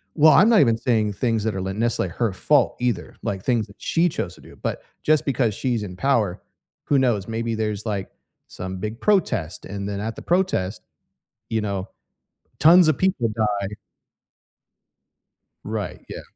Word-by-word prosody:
Well, 155 -1 +7
I'm 205 +9 +6
not 225 - +6
even 115 -5 +4
saying 110 -4 +1
things 115 -1 0
that 110 -3 -1
are - - -2
l 95 +1 -3
nec 115 +2 0
like, 90 - -1
her 110 +2 -1
fault 140 +6 +2
either, 120 -8 -1
like, 95 -1 -3
things 115 -4 +1
that 100 - -16
she 170 +1 +2
chose 90 - -4
to - - -17
do, - - -15
but - - -3 0.2
just 155 -1 +3
because 120 -6 +1
she's 120 -2 -1
in 90 -2 -7
power, 110 -6 +1 0.4
who 140 -2 +2
knows? 115 -7 +1
Maybe 115 0 -2
there's, 105 -1 -2
like, 100 -3 -3 0.4
some 95 +1 -6
big 110 +4 -5
protest, 125 - 0
and 100 0 -5
then 100 -1 -3
at 110 +1 -4
the - - -7
protest, 170 - 0 0.7
you 110 -1 0
know, 100 -2 -3 0.7
tons 170 +3 +7
of 155 - +3
people 185 - +1
die. 105 -2 -1 1.9
Right, - - -4
yeah. - - -6
110 Hz, 175 wpm, -23 LUFS, 100-135 Hz, 1.9 s, Well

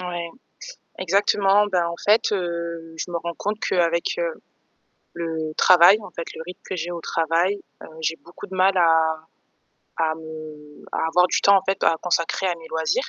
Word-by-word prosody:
Ouais, 175 -1 -4 0.7
exactement. 200 +2 +3
Ben, 180 -4 +1
en 170 - -4
fait, 215 +3 +5
heu, 170 -3 -4
je 175 - -5
me 170 - -1
rends 170 0 -5
compte 210 +1 -3
qu'avec, 170 - 0
heu, - - -3 0.7
le 160 -2 -4
travail, 180 +3 +7
en 205 - -10
fait 170 - -6
le - - -7
rythme 180 - -9
que 185 - -3
j'ai 170 +1 -4
au 170 -1 -5
travail, 165 +5 0 0.2
heu, - - -10
j'ai 165 +1 -1
beaucoup 170 - -12
de 190 - -10
mal 190 +1 +3
à 160 -2 +3 0.8
à 160 -1 +1
me 155 -2 -11
à - - 0
avoir 180 +2 +4
du - - 0
temps 200 0 +6
en 190 - +2
fait 195 0 0
p - - +1
à 165 - +4
consacrer 175 +1 0
à 180 - +1
mes 165 -1 -13
loisirs. 160 - -1
170 Hz, 195 wpm, -23 LUFS, 165-190 Hz, 0.8 s, travail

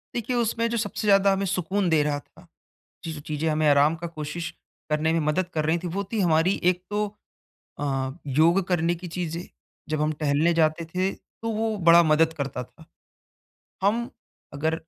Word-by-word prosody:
देखिए, 240 +1 -2
उसमें 230 -1 +1
जो 235 - -1
सबसे 220 -1 -3
ज़्यादा 195 -1 +5
हमें 195 +1 -1
सुकून 185 +1 0
दे 160 -2 +4
रहा 145 -1 -1
था, 180 +4 -20 0.6
ये 160 - -3
जो 150 - -7
चीज़ें 155 +1 -2
हमें 155 -1 +2
आराम 145 +3 +4
का 170 +1 -6
कोशिश 165 +1 -5 0.4
करने 155 +1 +1
में 165 - +1
मदद 155 +4 0
कर 155 -1 0
रही 160 +2 +2
थी, 175 - -6
वो 195 +4 -2
थी 220 - 0
हमारी 170 +1 +2
एक 180 0 -4
तो 210 0 0 0.7
अ, 135 -2 -1
योग 160 +7 +3
करने 175 -1 +1
की 175 +1 -8
चीज़ें, 175 0 -4 0.4
जब 155 -1 -1
हम 155 +1 +1
टहलने 150 +3 +2
जाते 160 0 +2
थे, 185 +4 -1
तो 225 +4 -8
वो 220 0 -1
बड़ा 170 +1 +9
मदद 160 0 +3
करता 140 -5 -4
था। 160 - -19 1.0
हम 230 +5 +1 0.5
अगर 160 +3 0
165 Hz, 185 wpm, -25 LUFS, 155-190 Hz, 1.0 s, बड़ा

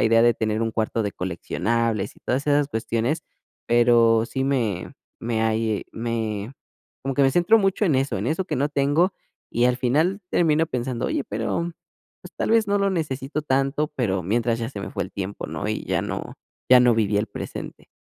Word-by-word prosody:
la - - +3
idea 115 0 +5
de 120 0 +5
tener 110 0 -1
un 115 -1 -1
cuarto 110 +1 -1
de 105 -1 -2
coleccionables 105 +4 -1
y - - -21
todas 135 +3 -1
esas 145 -1 +3
cuestiones. 115 +5 -1 0.5
Pero 115 -1 +5
sí 130 +2 -2
me 115 -10 -1 0.3
me, 115 -1 -1
ahí 110 -1 0
me, 110 -1 -3 0.5
como 135 0 -2
que 140 - +3
me 135 - +5
centro 175 +8 +5
mucho 195 0 +1
en 160 - +2
eso 135 -6 0
en 100 - -3
eso 160 +5 0
que - - -2
no 140 +3 +1
tengo, 145 +6 +2 0.4
y 120 - +1
al 125 0 +2
final 155 - +1
termino 160 -1 +3
pensando, 125 -4 -2
oye, - - -1
pero 115 +11 -2 0.5
pues, - - -12
tal - - -1
vez 225 -1 +4
no 200 - +2
lo 200 0 +2
necesito 150 -4 -2
tanto, 135 +2 +1
pero 95 -7 0
mientras 115 +5 0
ya 115 -1 -3
se 100 - -6
me - - -6
fue - - -2
el 95 - -10
tiempo, 100 +1 -5
¿no?, 100 - -4
y 110 - -2
ya - - 0
no - - -5 0.3
ya 130 - +9
no 125 -1 +5
viví 105 -2 +1
el 105 - 0
presente. - - -7
120 Hz, 205 wpm, -24 LUFS, 110-145 Hz, 0.5 s, ya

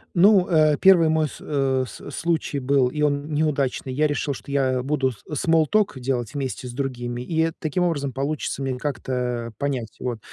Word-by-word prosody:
Ну, 190 +1 +6
э, 155 -3 +4
первый 175 -4 +6
мой 155 -1 +2
с - - -11
э, 135 -3 0
с 145 - -10
случай 160 -2 -1
был, 135 -1 +2
и 150 +3 -4
он 145 +1 0
неудачный: 140 -4 0
я 155 +3 +2
решил, 145 -1 -1
что 140 - -10
я 130 -2 +1
буду 135 -2 0
с 110 - -15
смол 160 +2 +3
ток 210 -4 +1
делать 125 +1 -2
вместе 130 -2 -3
с - - -6
другими, 125 -2 -3
и 160 +2 +1
таким 155 +3 -2
образом 145 -6 -1
получится 140 0 -2
мне 130 -2 -2
как-то 125 -4 -3
понять. 135 -6 -3
Вот. 120 -3 -3
140 Hz, 185 wpm, -23 LUFS, 130-155 Hz, -, Ну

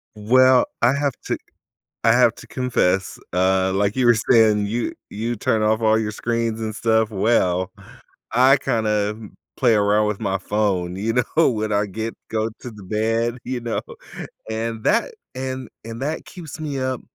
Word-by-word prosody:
Well, 130 +4 +5 0.2
I 120 +3 +4
have 140 -1 0
to - - -1 0.7
I - - +6
have - - +4
to - - -13
confess, 95 -7 0
uh 95 +1 +2
like 100 +1 +1
you 130 -2 +1
were 120 - +7 0.2
saying, 105 -3 +4
you 115 +3 -2 0.2
you 115 +3 -3
turn 110 +1 0
off 110 +1 +2
all 110 0 +3
your 105 -1 -2
screens 115 0 -2
and 110 -1 -3
stuff, 110 0 +1
well, 95 -3 +1 0.6
I 130 +4 +5
kinda, 105 -4 0
m 110 -3 -12 0.2
play 120 -4 +4
around 105 +1 +3
with 105 -2 -3
my 95 0 0
phone, 95 -3 -1
you 110 +4 -1 0.2
know, 165 -3 +5
when 110 -2 -2
I 100 0 +2
get 110 +4 -5
go 110 0 -1
to 125 - -7
the 105 -2 -12
bed, 115 +4 -1
you 125 -1 -3
know, 115 -1 -2 0.7
and 110 0 -3
that - - +2 0.2
and 130 -1 -5 0.2
and 115 +2 -7
that 155 +3 -3
keeps 165 -4 -10
me 145 -3 -3
up. 130 -1 -2
110 Hz, 175 wpm, -22 LUFS, 105-120 Hz, 0.7 s, were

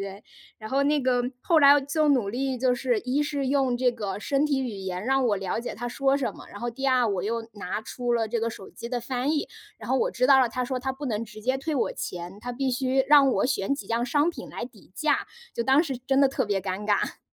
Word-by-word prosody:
对。 195 +1 -7 0.3
然 215 0 -8
后 275 +1 +2
那 290 +1 +2
个， 250 -2 +2 0.2
后 330 -2 +4
来 285 0 +8
就 300 +2 +1
努 250 -8 +3
力 260 +3 -2
就 250 0 +2
是 245 -2 0
一 260 +5 0
是 285 -2 -2
用 265 -2 +2
这 250 -1 +2
个 205 -4 -4
身 275 +6 +1
体 285 -3 +1
语 255 -3 -2
言 190 -1 -5
让 270 +1 +2
我 215 -4 +2
了 195 +2 -2
解 240 - -6
他 240 - -4
说 270 +2 +1
什 245 -7 -2
么， - - -12
然 - - -10
后 240 +2 -3
第 270 +4 -6
二， 255 -2 +3
我 195 -4 -1
又 230 +3 -2
拿 200 0 -4
出 240 +2 -3
了 230 -2 +1
这 230 +1 -2
个 230 - 0
手 195 - -10
机 235 - -8
的 245 0 -2
翻 250 +3 -2
译， 305 -1 -1 0.3
然 215 - -9
后 260 - +2
我 - - +1
知 250 +1 +1
道 270 -1 +7
了， 250 - +3
他 250 +2 -2
说 255 0 -3
他 265 +1 -2
不 280 +2 -6
能 220 -1 -2
直 215 -1 -12
接 255 +4 0
退 310 +4 -4
我 - - 0
钱， 180 +3 -6
他 245 - -5
必 265 +2 -1
须 260 +1 +1
让 285 -2 +7
我 - - +1
选 255 -4 0
几 - - -8
样 230 +1 0
商 290 +5 +2
品 345 - -6
来 - - -5
抵 - - -15
价， - - 0 0.3
就 235 - -1
当 270 +6 +4
时 270 -4 -3
真 270 +2 +1
的 275 - +6
特 265 -1 -1
别 200 -2 0
尴 190 +2 -4
尬。 205 -1 0
250 Hz, 290 characters per minute, -26 LUFS, 220-270 Hz, 0.3 s, 来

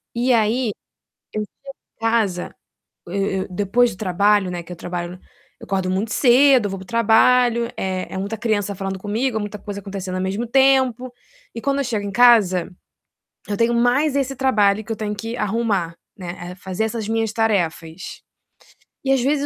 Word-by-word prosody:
E 245 +1 +2
aí, 225 +1 +2 0.6
eu 215 - -1
chego - - -3 0.5
em - - -46
casa 220 -6 0 0.5
eu 175 - -8 0.3
eu - - -9
depois 205 +6 +2
do 185 - -11
trabalho, 200 0 +2
né, 175 -1 -5
que 180 - -13
eu - - -5
trabalho 175 +1 -5 0.4
eu - - -11
acordo 190 -1 -1
muito 200 +4 -1
cedo, 255 -3 +5
vou 195 - -4
para - - -9
o - - -19
trabalho, 235 +1 +3
é 185 -1 -3
é - - -4
muita 200 +3 -3
criança 210 -3 -1
falando 195 0 -4
comigo, 220 +4 -1
é - - 0
muita 210 0 -5
coisa 205 -1 -6
acontecendo 190 -1 -5
ao 185 - -2
mesmo 200 +5 -2
tempo, 260 -1 +3 0.4
e 230 - -5
quando 280 +2 0
eu - - +1
chego 215 -5 -2
em 200 - -4
casa, 210 -6 +5 0.8
eu 205 - -1
tenho 230 +2 +2
mais 250 +5 +2
esse 270 -1 -1
trabalho 215 -6 +2
que 225 - -4
eu - - -4
tenho 210 -1 -3
que 225 +3 -5
arrumar, 205 -6 -1 0.2
né, 175 -1 -7
eh, - - -9
fazer 190 +3 -3
essas 220 -1 -3
minhas 225 -1 0
tarefas. 180 -6 -2 0.8
E 270 - +1
às 270 -2 +3
vezes 285 +2 +1
215 Hz, 190 wpm, -21 LUFS, 190-240 Hz, 0.8 s, cedo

